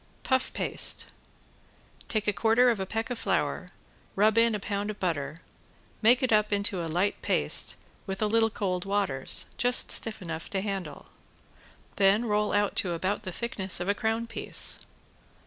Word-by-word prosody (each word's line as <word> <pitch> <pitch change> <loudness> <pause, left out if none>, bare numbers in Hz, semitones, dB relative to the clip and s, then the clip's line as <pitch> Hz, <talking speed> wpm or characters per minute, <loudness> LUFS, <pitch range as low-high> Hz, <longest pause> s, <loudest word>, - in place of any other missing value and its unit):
~PUFF 260 -1 +1
PASTE~ - - +1 1.0
Take 215 -2 -2
a 210 - +3
quarter 230 +6 +4
of 225 - -2
a 190 - -3
peck 225 +4 -3
of 245 - -3
flour, - - -1 0.5
rub 215 +2 +3
in 230 -1 +4
a - - -3
pound 200 +1 -3
of 210 - -6
butter, 155 -5 -2 0.6
make 240 +4 +5
it 255 - +2
up 210 0 +3
into 200 -3 0
a 165 - -4
light 180 +5 0
paste - - +1 0.3
with 190 0 -4
a 215 - +1
little 225 +1 +3
cold 185 -4 -2
waters, 195 -10 0
just 245 0 +3
stiff 220 -1 +2
enough 165 -3 -6
to 195 - -1
handle; 195 -2 -5 0.9
then 200 +4 +4
roll 210 -1 +1
out 205 -1 +1
to 180 -3 +2
about 190 +5 -2
the 185 -4 -6
thickness 190 -3 -2
of 175 - -4
a 200 - +3
crown 225 +2 -1
piece. 230 - -1
205 Hz, 170 wpm, -28 LUFS, 190-225 Hz, 1.0 s, make